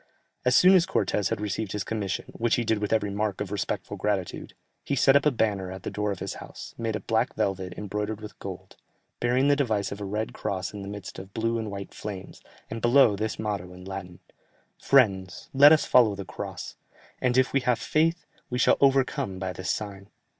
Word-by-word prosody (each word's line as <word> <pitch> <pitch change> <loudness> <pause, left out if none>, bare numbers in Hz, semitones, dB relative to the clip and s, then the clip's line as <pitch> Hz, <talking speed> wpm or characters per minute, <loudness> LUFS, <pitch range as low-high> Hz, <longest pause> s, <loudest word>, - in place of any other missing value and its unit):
As 125 0 +4
soon 185 +1 +7
as 185 -1 +5
Cortès 105 - 0
had 115 - -2
received 105 0 -3
his 105 -1 -2
commission, 105 -3 -3
which 115 0 +1
he 120 - 0
did 110 -2 +1
with 105 -1 -2
every 105 -2 +1
mark 105 -1 -1
of 105 -2 -4
respectful 105 - -3
gratitude, 100 -4 -2 0.3
he 140 - -1
set 135 +1 +5
up 140 +1 +5
a - - +4
banner 100 -6 0
at 95 0 -8
the - - -4
door 105 0 -1
of 100 - -3
his - - -4
house, - - -10
made 115 -2 -2
of 100 - -6
black 115 +3 +1
velvet 95 -2 -2
embroidered 105 +1 -3
in 105 -1 -7
gold, - - -8 0.4
bearing 125 +3 +2
the 145 - +5
device 110 -9 0
of 100 - -6
a - - -3
red 105 +2 -3
cross 95 -1 -3
in 105 - -6
the 100 - -7
midst 100 -2 -7
of 95 +1 -11
blue 115 0 0
and 110 -1 -4
white 100 -1 -7
flames, 100 -3 -7 0.3
and 115 0 -6
below, 120 -2 +5
this 110 +2 -3
motto 100 -4 -3
in 90 0 -12
Latin, 95 -2 -7 0.6
"Friends, 95 -9 +2
let 140 +2 +8
us 155 - +5
follow 115 -5 +5
the 100 -1 -6
Cross, - - -7 0.4
and 125 0 +2
if 130 0 +3
we 135 - +4
have 125 -2 +1
faith, 165 +7 +1 0.2
we 125 - -2
shall - - +4
overcome 135 -8 +2
by 95 -1 -3
this 95 +1 -5
sign." 100 -2 -4
105 Hz, 215 wpm, -27 LUFS, 100-120 Hz, 0.6 s, let